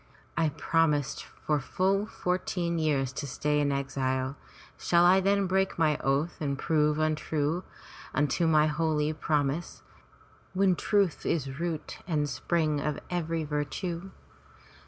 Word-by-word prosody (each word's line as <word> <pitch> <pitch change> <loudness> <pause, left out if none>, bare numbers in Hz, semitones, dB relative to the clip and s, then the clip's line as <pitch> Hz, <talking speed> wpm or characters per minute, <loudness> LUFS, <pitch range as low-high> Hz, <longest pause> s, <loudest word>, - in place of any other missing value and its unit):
I 165 -2 +2
promised 150 -3 +1 0.2
for 150 -1 +2
full 195 +8 0
fourteen 180 -3 -1
years 140 -4 +1
to 140 +1 -4
stay 150 +2 0
in 145 -1 +2
exile. 135 -1 -1 0.4
Shall 170 0 +3
I 185 +2 +6
then 200 +1 +2
break 190 +1 +1
my 155 -3 +3
oath 140 +5 0
and 140 -2 -1
prove 150 0 +2
untrue 155 +1 0 0.5
unto 145 +4 +1
my 155 -1 +5
holy 155 0 +1
prom 150 -3 +1
ise, 170 +4 -7 0.7
when 190 -1 +4
truth 200 -3 +1
is 140 -3 -2
root 170 -3 -4
and 150 -4 +1
spring 150 +3 0
of 150 0 -1
every 165 -2 -1
virtue? 165 +5 -3
155 Hz, 135 wpm, -29 LUFS, 145-170 Hz, 0.7 s, I